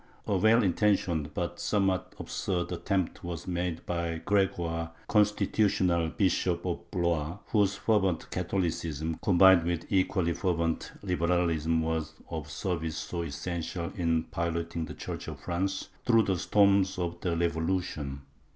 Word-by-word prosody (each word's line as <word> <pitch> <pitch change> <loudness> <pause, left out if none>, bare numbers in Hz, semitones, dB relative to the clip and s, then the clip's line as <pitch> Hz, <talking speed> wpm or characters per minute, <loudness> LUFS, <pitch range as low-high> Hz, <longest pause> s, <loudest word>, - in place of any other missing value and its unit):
A 100 - 0
well 110 +5 +5
intentioned, 90 -6 +1
but 85 -1 -3
some 105 -2 +1
what 95 -2 -1
absurd, 90 -2 -2
attempt 95 0 -1
was 85 -1 -5
made 90 -2 -2
by 85 -1 -2
Gregoire, 85 -5 0
Constitutional 100 -5 +2
Bishop 90 -1 +1
of 85 -1 -4
Blois, 85 -2 -1
whose 100 -2 +3
fervent 95 -4 +1
Catholicism, 80 -4 -2
combined 95 -1 +6
with 85 0 -2
equally 95 -3 +2
fervent 85 -3 -1
liberalism, 85 -3 +1
was 80 -1 -2 0.2
of 80 -3 -4
service 80 -1 -3
so 85 +1 -3
essential 85 +2 -4
in 80 -3 +1
piloting 85 0 -2
the - - -8
Church - - -6
of - - -6
France 95 +2 -2
through 115 -2 +5
the 95 -3 0
storms 100 0 +3
of 85 -1 -3
the 85 -3 0
Revolution. 80 -4 -1
85 Hz, 135 wpm, -29 LUFS, 80-95 Hz, 0.2 s, combined